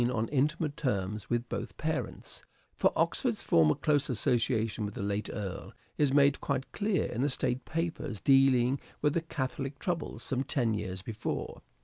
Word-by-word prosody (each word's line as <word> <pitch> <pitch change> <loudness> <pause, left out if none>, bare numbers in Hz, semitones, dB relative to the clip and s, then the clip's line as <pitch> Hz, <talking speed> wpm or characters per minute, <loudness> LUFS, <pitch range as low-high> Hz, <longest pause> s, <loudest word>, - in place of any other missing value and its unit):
on 115 -3 0
intimate 150 +2 +1
terms 105 - -2
with 120 0 0
both 120 - -5
parents; 155 +1 -4 0.3
for - - +3
Oxford's - - +1
former 80 -2 +4
close 145 -1 +1
association 115 -1 +1
with 105 -1 -4
the - - -3
late 100 +1 -1
Earl 100 -3 -5 0.2
is 145 -3 +2
made 140 0 +4
quite 135 -2 -2
clear 205 -2 0
in 120 - -3
the 145 - +2
State 125 -1 -1
Papers 160 - -3
dealing 135 +1 +4 0.2
with 150 -1 +3
the 170 - +1
catholic 135 -3 -4
troubles 170 0 -3
some 130 -1 -1
ten 125 -5 +1
years 95 -3 -4
before. 110 0 -4
130 Hz, 160 wpm, -30 LUFS, 110-145 Hz, 0.3 s, former